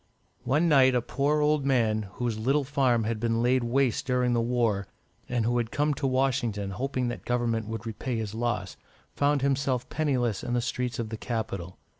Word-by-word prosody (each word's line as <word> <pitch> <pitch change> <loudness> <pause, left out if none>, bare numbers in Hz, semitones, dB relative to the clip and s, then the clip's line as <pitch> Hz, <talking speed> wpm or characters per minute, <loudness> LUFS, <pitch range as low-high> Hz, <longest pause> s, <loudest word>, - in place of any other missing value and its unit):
One 150 +7 +2
night, 130 -4 +5
a 125 - +3
poor 145 +4 +1
old 150 -1 +2
man, 110 -6 +1
whose 120 -3 -2
little 135 +6 +2
farm 130 -4 +2
had 110 0 -2
been 115 0 0
laid 125 +1 +3
waste 125 0 +1
during 125 -1 +2
the 120 - +2
war, 115 -5 0 0.4
and 120 -3 0
who 120 +1 +2
had 115 -2 -2
come 145 +4 +1
to 140 0 -2
Washington, 120 -6 0
hoping 130 +4 -2
that 120 - -6
Government 115 -3 -1
would 115 0 -5
repay 115 +2 -3
his 110 -2 -4
loss, 110 -5 -2 0.4
found 145 -1 +1
himself 135 -2 0
penniless 125 -9 0
in 120 - -3
the - - +2
streets 125 +2 -2
of 115 -3 -3
the 110 - -5
capital. 100 -7 -4
120 Hz, 190 wpm, -27 LUFS, 115-135 Hz, 0.4 s, night